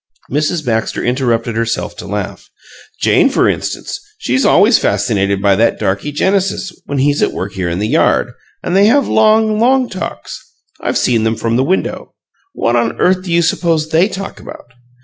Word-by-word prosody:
Mrs. 155 Hz, +3 st, -1 dB
Baxter 110 Hz, -2 st, -1 dB
interrupted 120 Hz, -2 st, 0 dB
herself 115 Hz, 0 st, -2 dB
to -, -, -8 dB
laugh. -, -, -5 dB, 0.5 s
"Jane, -, -, +4 dB
for -, -, +2 dB
instance -, -, -3 dB, 0.2 s
she's 265 Hz, -11 st, 0 dB
always 215 Hz, +5 st, +5 dB
fascinated 100 Hz, -3 st, 0 dB
by 100 Hz, -1 st, +4 dB
that 115 Hz, +4 st, +2 dB
darky, 100 Hz, +10 st, -2 dB
Genesis, 190 Hz, +3 st, -1 dB
when 140 Hz, -, -3 dB
he's 145 Hz, +2 st, +1 dB
at -, -, +2 dB
work 100 Hz, +2 st, -5 dB
here 95 Hz, -3 st, -2 dB
in 85 Hz, -, -2 dB
the 105 Hz, +3 st, -1 dB
yard, -, -, +2 dB, 0.3 s
and 180 Hz, -, -1 dB
they 200 Hz, +2 st, +5 dB
have 275 Hz, +3 st, +3 dB
long, 220 Hz, 0 st, +3 dB
long 255 Hz, +2 st, +3 dB
talks; 185 Hz, -, -7 dB, 0.4 s
I've -, -, -1 dB
seen 115 Hz, -3 st, +1 dB
them 110 Hz, 0 st, 0 dB
from 115 Hz, +1 st, -1 dB
the 130 Hz, -, +2 dB
window. 185 Hz, +7 st, -2 dB, 0.4 s
What 120 Hz, -, 0 dB
on 115 Hz, -1 st, 0 dB
earth 185 Hz, 0 st, +2 dB
do 185 Hz, -2 st, -7 dB
you 170 Hz, 0 st, +3 dB
suppose 160 Hz, -1 st, 0 dB
they 165 Hz, +4 st, +3 dB
talk 195 Hz, -1 st, -7 dB
about? 120 Hz, -, -12 dB
145 Hz, 180 wpm, -15 LUFS, 115-190 Hz, 0.5 s, always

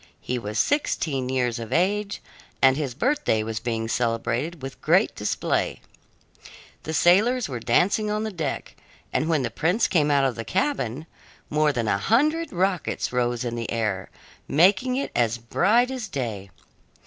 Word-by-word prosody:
He 125 Hz, 0 st, -3 dB
was 105 Hz, -1 st, -5 dB
sixteen 140 Hz, -, 0 dB
years 125 Hz, -3 st, 0 dB
of 115 Hz, -2 st, -7 dB
age, 200 Hz, +3 st, 0 dB, 0.4 s
and 130 Hz, -1 st, +5 dB
his 140 Hz, -4 st, -3 dB
birthday 240 Hz, -, +1 dB
was 110 Hz, 0 st, -3 dB
being 115 Hz, -1 st, -2 dB
celebrated 120 Hz, +7 st, -1 dB
with 135 Hz, -, -7 dB
great -, -, +3 dB
display. -, -, -1 dB, 1.0 s
The 160 Hz, -, -5 dB
sailors 220 Hz, +10 st, +4 dB
were 125 Hz, -4 st, -5 dB
dancing 185 Hz, -, +2 dB
on 210 Hz, +1 st, -1 dB
deck, 155 Hz, -5 st, -4 dB, 0.4 s
and 155 Hz, -, 0 dB
when 155 Hz, -5 st, +2 dB
the -, -, -2 dB
prince 175 Hz, +9 st, +1 dB
came 150 Hz, -5 st, +2 dB
out 140 Hz, -1 st, +3 dB
of 130 Hz, -, +1 dB
the 115 Hz, -, -6 dB
cabin, 155 Hz, -, -1 dB, 0.5 s
more 150 Hz, 0 st, +3 dB
than 120 Hz, -5 st, -2 dB
a 100 Hz, -, +1 dB
hundred 305 Hz, -, +2 dB
rockets 185 Hz, -7 st, -1 dB
rose 120 Hz, 0 st, 0 dB
in 120 Hz, -, -2 dB
the 115 Hz, -1 st, -4 dB
air, 105 Hz, -5 st, -2 dB, 0.4 s
making 190 Hz, -, +3 dB
it 275 Hz, -, -2 dB
as 115 Hz, -1 st, +1 dB
bright 210 Hz, -, +2 dB
as 250 Hz, -4 st, -4 dB
day. 115 Hz, -, -4 dB
140 Hz, 160 wpm, -24 LUFS, 120-195 Hz, 1.0 s, and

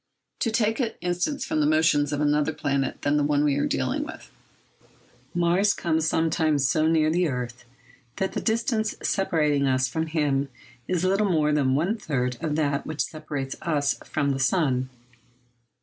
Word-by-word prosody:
To 230 Hz, -, +1 dB
take 220 Hz, +1 st, +1 dB
an 240 Hz, -4 st, -1 dB
instance 180 Hz, -, -1 dB
from 155 Hz, -, -1 dB
the 150 Hz, -, +3 dB
motions 155 Hz, -2 st, +3 dB
of 145 Hz, 0 st, -1 dB
another 150 Hz, +1 st, +2 dB
planet 140 Hz, -2 st, -2 dB
than 145 Hz, +1 st, +2 dB
the 145 Hz, -, +2 dB
one 145 Hz, 0 st, +2 dB
we 145 Hz, -2 st, +2 dB
are 145 Hz, -, +1 dB
dealing -, -, -1 dB
with. -, -, -10 dB, 1.0 s
Mars 175 Hz, +4 st, +3 dB
comes 160 Hz, -1 st, 0 dB
sometimes 160 Hz, -4 st, +1 dB
so 155 Hz, +5 st, +2 dB
near 155 Hz, -1 st, +3 dB
the 175 Hz, +1 st, +2 dB
earth 125 Hz, -3 st, -5 dB, 0.5 s
that 190 Hz, -, -2 dB
the -, -, -2 dB
distance 220 Hz, -1 st, 0 dB
separating 150 Hz, -7 st, +1 dB
us 130 Hz, 0 st, +2 dB
from 160 Hz, +5 st, -2 dB
him 145 Hz, -3 st, 0 dB, 0.4 s
is 180 Hz, -1 st, 0 dB
little 195 Hz, +2 st, +2 dB
more 155 Hz, -4 st, +2 dB
than 135 Hz, -3 st, +2 dB
one 175 Hz, +10 st, 0 dB
third 125 Hz, -, -2 dB
of 155 Hz, -2 st, -1 dB
that 145 Hz, -2 st, 0 dB
which 155 Hz, -1 st, -1 dB
separates 145 Hz, -4 st, -5 dB
us 145 Hz, -4 st, 0 dB
from 140 Hz, -1 st, -1 dB
the 135 Hz, -, -2 dB
sun. 130 Hz, -2 st, +1 dB
155 Hz, 170 wpm, -25 LUFS, 140-175 Hz, 1.0 s, the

